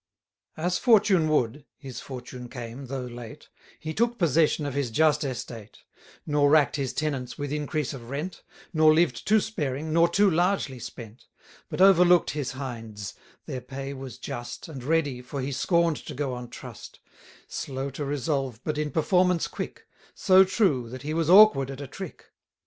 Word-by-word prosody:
As 175 Hz, +3 st, 0 dB
fortune 200 Hz, -9 st, +4 dB
would 140 Hz, -2 st, 0 dB
(his 130 Hz, -3 st, -8 dB
fortune 125 Hz, -1 st, -8 dB
came, 125 Hz, +1 st, -7 dB
though 130 Hz, -1 st, -4 dB
late) 120 Hz, -2 st, -10 dB, 0.3 s
He 155 Hz, 0 st, -5 dB
took 235 Hz, +5 st, +1 dB
possession 160 Hz, -, +2 dB
of 145 Hz, -, -3 dB
his 140 Hz, -3 st, -1 dB
just 150 Hz, +4 st, +3 dB
estate: 115 Hz, -5 st, -7 dB, 0.4 s
Nor 145 Hz, -1 st, +3 dB
rack'd 150 Hz, -3 st, +4 dB
his 135 Hz, -3 st, -2 dB
tenants 140 Hz, -5 st, -3 dB
with 145 Hz, -1 st, -4 dB
increase 150 Hz, -1 st, -2 dB
of 120 Hz, -3 st, -9 dB
rent; 150 Hz, +7 st, -5 dB, 0.3 s
Nor 155 Hz, -1 st, +5 dB
lived 155 Hz, -8 st, +1 dB
too 215 Hz, +1 st, +5 dB
sparing, 155 Hz, -7 st, -3 dB
nor 170 Hz, +1 st, +5 dB
too 200 Hz, +4 st, +4 dB
largely 175 Hz, -6 st, +1 dB
spent; 115 Hz, -1 st, -10 dB, 0.4 s
But -, -, -3 dB
overlook'd 180 Hz, -2 st, +6 dB
his 140 Hz, -4 st, -3 dB
hinds; 115 Hz, -6 st, -6 dB, 0.3 s
their 130 Hz, -, -5 dB
pay 135 Hz, +2 st, -6 dB
was 130 Hz, -2 st, -8 dB
just, 120 Hz, 0 st, -7 dB
920 -, -, -10 dB
And 125 Hz, +4 st, -7 dB
ready, 145 Hz, -6 st, +1 dB
for 130 Hz, +3 st, -6 dB
he 135 Hz, +2 st, -2 dB
scorn'd 170 Hz, +3 st, +2 dB
to 150 Hz, -, -8 dB
go 140 Hz, -1 st, -2 dB
on 125 Hz, -1 st, -7 dB
trust: -, -, -11 dB, 0.5 s
Slow 135 Hz, 0 st, -4 dB
to 140 Hz, +3 st, -5 dB
resolve, 135 Hz, -3 st, -2 dB
but 155 Hz, -1 st, -2 dB
in 150 Hz, 0 st, -1 dB
performance 180 Hz, +3 st, +2 dB
quick; -, -, -7 dB, 0.3 s
So 190 Hz, -1 st, +6 dB
true, 185 Hz, -, +1 dB
that 130 Hz, +2 st, -8 dB
he 150 Hz, +2 st, -3 dB
was 165 Hz, -1 st, 0 dB
awkward 190 Hz, -9 st, +7 dB
at 135 Hz, 0 st, -7 dB
a 140 Hz, -, -5 dB
trick. 175 Hz, +5 st, -9 dB
145 Hz, 170 wpm, -26 LUFS, 130-165 Hz, 0.5 s, awkward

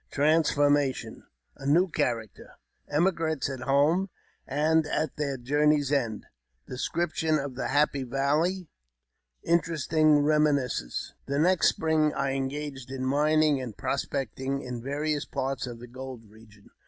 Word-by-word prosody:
— -, -, -43 dB
Transformation. 145 Hz, -2 st, +1 dB
— -, -, -34 dB
A -, -, -3 dB
new 170 Hz, +6 st, +4 dB
Character. 115 Hz, -, -3 dB, 0.2 s
— -, -, -45 dB
Emigrant's 165 Hz, -4 st, +1 dB
at 135 Hz, -, -6 dB
home 145 Hz, +9 st, +2 dB, 0.4 s
and 155 Hz, +3 st, +2 dB
at 155 Hz, -1 st, -1 dB
their 140 Hz, -3 st, -2 dB
Journey's 145 Hz, +2 st, +2 dB
End. 115 Hz, -7 st, -1 dB, 0.2 s
— -, -, -47 dB
Description 155 Hz, +3 st, -1 dB
of 140 Hz, -2 st, -4 dB
the 125 Hz, -, -3 dB
Happy 145 Hz, 0 st, +2 dB
Valley. 150 Hz, +8 st, 0 dB, 0.4 s
— 60 Hz, 0 st, -52 dB
Interesting 155 Hz, -2 st, +2 dB
Eeminiscence. 145 Hz, -, 0 dB
THE 140 Hz, -, -1 dB
next 175 Hz, +4 st, +4 dB
spring 155 Hz, -1 st, +1 dB
I 140 Hz, 0 st, 0 dB
engaged 135 Hz, -1 st, -4 dB
in 130 Hz, -1 st, -4 dB
mining 150 Hz, +1 st, +3 dB
and 120 Hz, -5 st, -7 dB
prospecting 135 Hz, 0 st, -3 dB
in 125 Hz, -2 st, -5 dB
various 145 Hz, +3 st, -2 dB
parts 135 Hz, 0 st, -3 dB
of 120 Hz, -1 st, -7 dB
the 120 Hz, -, -10 dB
gold 130 Hz, -1 st, -9 dB
region. 105 Hz, -1 st, -19 dB
140 Hz, 140 wpm, -27 LUFS, 130-155 Hz, 0.4 s, new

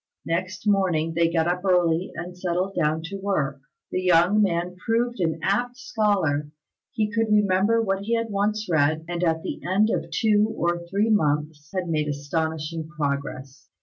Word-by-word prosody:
Next 185 Hz, +5 st, -3 dB
morning 175 Hz, -6 st, +2 dB
they 165 Hz, 0 st, +2 dB
got 165 Hz, -1 st, +2 dB
up 180 Hz, +1 st, -1 dB
early 180 Hz, -2 st, +2 dB
and 175 Hz, +2 st, -6 dB
settled 180 Hz, +1 st, -2 dB
down 160 Hz, -2 st, 0 dB
to 195 Hz, +4 st, -5 dB
work. 150 Hz, -9 st, -1 dB, 0.3 s
The 185 Hz, -, -1 dB
young 180 Hz, +3 st, +4 dB
man 180 Hz, -2 st, 0 dB
proved 240 Hz, +2 st, 0 dB
an 160 Hz, -3 st, 0 dB
apt 245 Hz, +5 st, 0 dB
scholar; 195 Hz, -, 0 dB, 0.4 s
he 215 Hz, -1 st, 0 dB
could 225 Hz, -1 st, 0 dB
remember 210 Hz, +2 st, +3 dB
what 195 Hz, -2 st, 0 dB
he 230 Hz, +4 st, 0 dB
had 230 Hz, -1 st, -2 dB
once 210 Hz, +2 st, 0 dB
read, 155 Hz, -1 st, +1 dB
and 175 Hz, 0 st, -3 dB
at 160 Hz, -2 st, +1 dB
the -, -, -5 dB
end 200 Hz, +5 st, +2 dB
of -, -, -2 dB
two 215 Hz, 0 st, +2 dB
or 175 Hz, 0 st, 0 dB
three 205 Hz, +5 st, +1 dB
months 150 Hz, -5 st, 0 dB
had 185 Hz, -2 st, -2 dB
made 155 Hz, -2 st, 0 dB
astonishing 160 Hz, +2 st, -3 dB
progress. 140 Hz, -2 st, -4 dB
180 Hz, 170 wpm, -24 LUFS, 160-205 Hz, 0.4 s, young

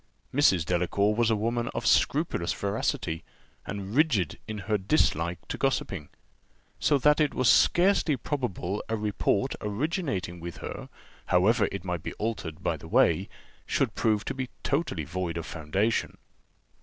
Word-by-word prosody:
Mrs. 95 Hz, -, +4 dB
Delacour 90 Hz, +4 st, +1 dB
was 115 Hz, +1 st, +2 dB
a 110 Hz, -, +3 dB
woman 115 Hz, +3 st, -1 dB
of -, -, -3 dB
scrupulous 145 Hz, -, +2 dB
veracity, 85 Hz, -4 st, -2 dB, 0.4 s
and 100 Hz, 0 st, -5 dB
rigid 125 Hz, -, +2 dB
in 110 Hz, -1 st, -4 dB
her 110 Hz, -, +1 dB
dislike 90 Hz, -, +1 dB
to -, -, -5 dB
gossiping; 75 Hz, -, -1 dB, 0.7 s
so 145 Hz, -, +3 dB
that 150 Hz, +3 st, +4 dB
it 150 Hz, -2 st, +2 dB
was 130 Hz, -, +2 dB
scarcely 175 Hz, -5 st, +4 dB
probable 110 Hz, -, -3 dB
a 115 Hz, -, 0 dB
report 105 Hz, +3 st, 0 dB
originating 105 Hz, -, -2 dB
with 85 Hz, 0 st, -7 dB
her, -, -, -7 dB, 0.4 s
however 100 Hz, +4 st, +3 dB
it 100 Hz, -2 st, -5 dB
might 90 Hz, -3 st, -2 dB
be -, -, -5 dB
altered 105 Hz, -8 st, -4 dB
by -, -, 0 dB
the -, -, -11 dB
way, -, -, +3 dB, 0.4 s
should -, -, +1 dB
prove 110 Hz, -2 st, +1 dB
to -, -, -2 dB
be 130 Hz, -2 st, -4 dB
totally 140 Hz, -, -1 dB
void 85 Hz, +2 st, -3 dB
of 85 Hz, -, -4 dB
foundation. 95 Hz, +9 st, -1 dB
105 Hz, 150 wpm, -28 LUFS, 90-130 Hz, 0.7 s, Mrs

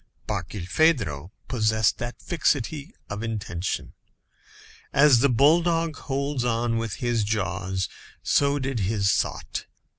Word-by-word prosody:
Barkilphedro 95 Hz, -, 0 dB, 0.2 s
possessed 110 Hz, -3 st, +2 dB
that 120 Hz, +1 st, -5 dB
fixity 150 Hz, -, -1 dB
of 100 Hz, +1 st, -5 dB
intention. 105 Hz, -5 st, -3 dB, 1.0 s
As 140 Hz, -3 st, +6 dB
the 140 Hz, +3 st, +4 dB
bulldog 165 Hz, +5 st, +3 dB
holds 140 Hz, -1 st, -2 dB
on 115 Hz, -1 st, 0 dB
with 115 Hz, -2 st, -3 dB
his 120 Hz, -3 st, 0 dB
jaws, 95 Hz, -2 st, -1 dB, 0.4 s
so 140 Hz, 0 st, +3 dB
did 135 Hz, -3 st, -2 dB
his 100 Hz, 0 st, +1 dB
thought. -, -, -2 dB
115 Hz, 110 wpm, -25 LUFS, 100-140 Hz, 1.0 s, As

